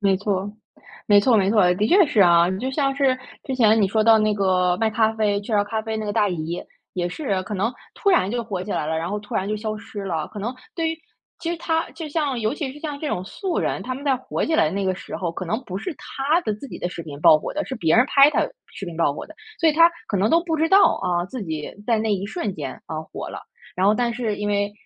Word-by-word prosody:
没 195 Hz, -2 st, +3 dB
错， 200 Hz, 0 st, -2 dB, 0.6 s
没 205 Hz, -1 st, +6 dB
错 235 Hz, +2 st, +4 dB
没 195 Hz, -1 st, +3 dB
错， 205 Hz, -5 st, +4 dB
的 205 Hz, +4 st, +1 dB
确 375 Hz, -2 st, +6 dB
是 220 Hz, -7 st, +1 dB
啊， 170 Hz, -1 st, +6 dB
就 260 Hz, +5 st, -2 dB
像 275 Hz, -1 st, 0 dB
是 270 Hz, -2 st, +2 dB, 0.3 s
之 265 Hz, -, -3 dB
前 225 Hz, -3 st, +4 dB
你 200 Hz, -, +4 dB
说 215 Hz, +2 st, +2 dB
到 225 Hz, 0 st, +7 dB
那 215 Hz, -1 st, +2 dB
个 185 Hz, -2 st, +2 dB
卖 225 Hz, -1 st, +1 dB
咖 220 Hz, 0 st, +2 dB
啡 210 Hz, -2 st, +1 dB
雀 210 Hz, +3 st, -7 dB
巢 205 Hz, -1 st, +3 dB
咖 220 Hz, +1 st, -3 dB
啡 220 Hz, 0 st, -3 dB
那 215 Hz, -1 st, -4 dB
个 205 Hz, -, -2 dB
大 205 Hz, 0 st, +2 dB
姨， 170 Hz, 0 st, -3 dB, 0.3 s
也 175 Hz, -1 st, -1 dB
是， 195 Hz, -, -2 dB
可 210 Hz, -, -5 dB
能 210 Hz, +5 st, 0 dB, 0.2 s
突 400 Hz, -, +1 dB
然 190 Hz, -, +3 dB
就 240 Hz, +1 st, -1 dB
火 195 Hz, -5 st, -4 dB
起 205 Hz, -, -4 dB
来 -, -, -1 dB
了， 160 Hz, +1 st, -1 dB
然 165 Hz, -, -3 dB
后 210 Hz, -, -2 dB
突 210 Hz, -, -9 dB
然 190 Hz, +2 st, 0 dB
就 215 Hz, -, -1 dB
消 215 Hz, 0 st, -4 dB
失 205 Hz, -1 st, -8 dB
了， 165 Hz, -5 st, -2 dB
可 210 Hz, -, -9 dB
能 230 Hz, +6 st, -3 dB, 0.2 s
对 325 Hz, -1 st, 0 dB
于 325 Hz, -, -5 dB, 0.4 s
其 335 Hz, 0 st, -3 dB
实 345 Hz, -, -2 dB
她 325 Hz, 0 st, -1 dB
就 325 Hz, -2 st, -7 dB
像 290 Hz, -4 st, -1 dB
尤 220 Hz, +4 st, 0 dB
其 285 Hz, -4 st, -4 dB
是 290 Hz, -, -12 dB
像 295 Hz, -2 st, -5 dB
这 305 Hz, -, -3 dB
种 180 Hz, -, -2 dB
素 355 Hz, -, -3 dB
人， -, -, -1 dB
他 255 Hz, -, -4 dB
们 270 Hz, -, -8 dB
在 275 Hz, -2 st, +2 dB
火 255 Hz, -, -3 dB
起 320 Hz, -, 0 dB
来 160 Hz, -, +4 dB
的 155 Hz, -, -1 dB
那 195 Hz, +1 st, -2 dB
个 185 Hz, -, +1 dB
时 -, -, -7 dB
候， 175 Hz, -3 st, -2 dB
可 185 Hz, -, -5 dB
能 220 Hz, +9 st, -2 dB
不 185 Hz, -, -6 dB
是 335 Hz, -, -5 dB
她 290 Hz, +5 st, 0 dB
的 215 Hz, -, -1 dB
自 215 Hz, +7 st, -9 dB
己 -, -, -8 dB
的 175 Hz, -, -2 dB
视 175 Hz, -1 st, -7 dB
频 145 Hz, -2 st, -9 dB
爆 155 Hz, -, +7 dB
火 -, -, -5 dB
的， 300 Hz, -, -1 dB
是 265 Hz, -, -4 dB
别 165 Hz, -6 st, +2 dB
人 245 Hz, -, +6 dB
拍 280 Hz, +1 st, +6 dB
她 -, -, +2 dB, 0.3 s
视 195 Hz, -, -6 dB
频 170 Hz, -2 st, -7 dB
爆 165 Hz, -4 st, +2 dB
火 -, -, -7 dB
的。 315 Hz, -, -14 dB, 0.3 s
所 330 Hz, -, +5 dB
以 -, -, +4 dB
她 335 Hz, +2 st, +6 dB, 0.2 s
可 200 Hz, -, -1 dB
能 195 Hz, +3 st, +2 dB
都 335 Hz, +1 st, +4 dB
不 325 Hz, -2 st, -1 dB
知 320 Hz, -, +2 dB
道， 395 Hz, +2 st, +5 dB
啊， 175 Hz, -2 st, 0 dB
自 240 Hz, +4 st, -6 dB
己 155 Hz, -3 st, -4 dB, 0.2 s
在 230 Hz, -2 st, +2 dB
那 220 Hz, -1 st, +1 dB
一 195 Hz, 0 st, -3 dB
瞬 210 Hz, -, -3 dB
间， 140 Hz, -5 st, -6 dB
呃， 155 Hz, -1 st, -4 dB
火 -, -, -5 dB
了。 -, -, -7 dB, 0.4 s
然 185 Hz, -, +2 dB
后 210 Hz, -, +5 dB
但 240 Hz, +1 st, 0 dB
是 225 Hz, -3 st, -2 dB
因 205 Hz, 0 st, -3 dB
为 205 Hz, 0 st, 0 dB
215 Hz, 310 characters per minute, -23 LUFS, 190-265 Hz, 0.6 s, 到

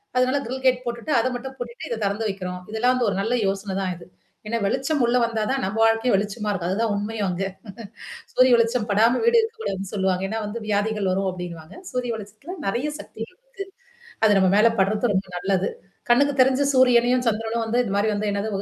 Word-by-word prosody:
அதனால 255 Hz, +3 st, +2 dB
grill 260 Hz, +2 st, -5 dB
gate 255 Hz, -1 st, +3 dB
போட்டுட்டு 235 Hz, +5 st, -4 dB
அத 230 Hz, -, +1 dB
மட்டும் 265 Hz, +2 st, -6 dB
பூட்டிட்டு 240 Hz, 0 st, -7 dB
இத 230 Hz, -2 st, -3 dB
திறந்து 200 Hz, +3 st, -1 dB
வைக்கிறோம். 180 Hz, -2 st, -5 dB
இதெல்லாம் 245 Hz, +3 st, +2 dB
வந்து 245 Hz, -3 st, +1 dB
ஒரு 190 Hz, -, -2 dB
நல்ல 240 Hz, +4 st, 0 dB
யோசனை 195 Hz, 0 st, -2 dB
தான் 185 Hz, -1 st, -1 dB
இது. 170 Hz, -, -13 dB, 0.4 s
ஏன்னா 230 Hz, +2 st, -1 dB
வெளிச்சம் 270 Hz, +6 st, 0 dB
உள்ள 240 Hz, +1 st, +2 dB
வந்தா 225 Hz, -2 st, -2 dB
தான் 270 Hz, -1 st, -1 dB
நம்ம 215 Hz, -, -4 dB
வாழ்க்கையும் 225 Hz, 0 st, +3 dB
வெளிச்சமா 210 Hz, +1 st, -3 dB
இருக்கும். 180 Hz, -3 st, -2 dB
அதுதான் 225 Hz, +2 st, 0 dB
உண்மையும் 205 Hz, 0 st, -2 dB
அங்க. 180 Hz, +2 st, -2 dB, 0.9 s
சூரிய 255 Hz, 0 st, +5 dB
வெளிச்சம் 230 Hz, -1 st, +1 dB
படாம 225 Hz, +5 st, +4 dB
வீடு 470 Hz, 0 st, +5 dB
இருக்கக்கூடாதுன்னு 435 Hz, -, -4 dB
சொல்லுவாங்க. 190 Hz, -2 st, 0 dB
ஏன்னா 225 Hz, +1 st, -2 dB
வந்து 230 Hz, +3 st, -5 dB
வியாதிகள் 205 Hz, -1 st, 0 dB
வரும் 195 Hz, +1 st, 0 dB
அப்டின்னுவாங்க. 175 Hz, -3 st, -8 dB, 0.2 s
சூரிய 250 Hz, -1 st, -1 dB
வளிச்சத்தல 215 Hz, -, -9 dB
நெறைய 245 Hz, +9 st, -1 dB
சக்திகள் 225 Hz, +10 st, -9 dB
இருக்கு. -, -, -9 dB, 0.6 s
அது 215 Hz, -, +6 dB
நம்ம 190 Hz, -1 st, +4 dB
மேல 215 Hz, +2 st, +6 dB
படுறது 210 Hz, +3 st, +1 dB
ரொம்ப 190 Hz, 0 st, -1 dB
நல்லது. 195 Hz, 0 st, 0 dB, 0.4 s
கண்ணுக்கு 280 Hz, +4 st, +4 dB
தெரிஞ்சு 265 Hz, +2 st, +3 dB
சூரியனையும் 250 Hz, -1 st, +4 dB
சந்திரனும் 225 Hz, +1 st, -1 dB
வந்து 230 Hz, +2 st, -1 dB
இந்த 220 Hz, -, -3 dB
மாரி 205 Hz, +2 st, +2 dB
வந்து 205 Hz, 0 st, -1 dB
என்னது 200 Hz, +1 st, -2 dB
225 Hz, 195 wpm, -23 LUFS, 200-250 Hz, 0.9 s, அது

